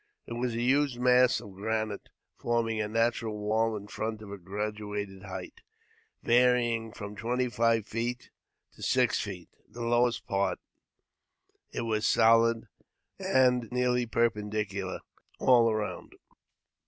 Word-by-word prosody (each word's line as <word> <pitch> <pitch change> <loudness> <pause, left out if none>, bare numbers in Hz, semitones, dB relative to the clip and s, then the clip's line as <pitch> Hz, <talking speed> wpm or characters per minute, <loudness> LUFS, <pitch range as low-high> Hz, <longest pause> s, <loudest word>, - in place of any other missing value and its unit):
It - - -7
was 120 0 -2
a 115 - -1
huge 135 0 +2
mass 125 0 +4
of 100 - -11
granite, 110 +1 -3 0.3
forming 115 -2 0
a 105 - -1
natural 115 0 0
wall 110 +1 0
in 100 - -9
front 110 +1 -4
of 100 - -10
a 100 - -6
graduated 105 +1 -4
height, 95 -2 -8 0.6
varying 120 -2 +3
from 105 -2 -8
twenty 125 +3 -1
five 115 -2 +2
feet 120 +2 -4 0.4
to - - -17
six - - +2
feet, - - -7 0.2
the 120 0 -6
lowest 120 0 +2
part; 100 0 0 1.1
it - - -3
was 110 -2 0
solid, 115 0 +4 0.5
an^ 125 -3 +2
nearly 125 -1 +1
perpendicular 105 -4 -1 0.4
all 120 -3 +5
round. 110 -1 -4
115 Hz, 130 wpm, -29 LUFS, 105-120 Hz, 1.1 s, all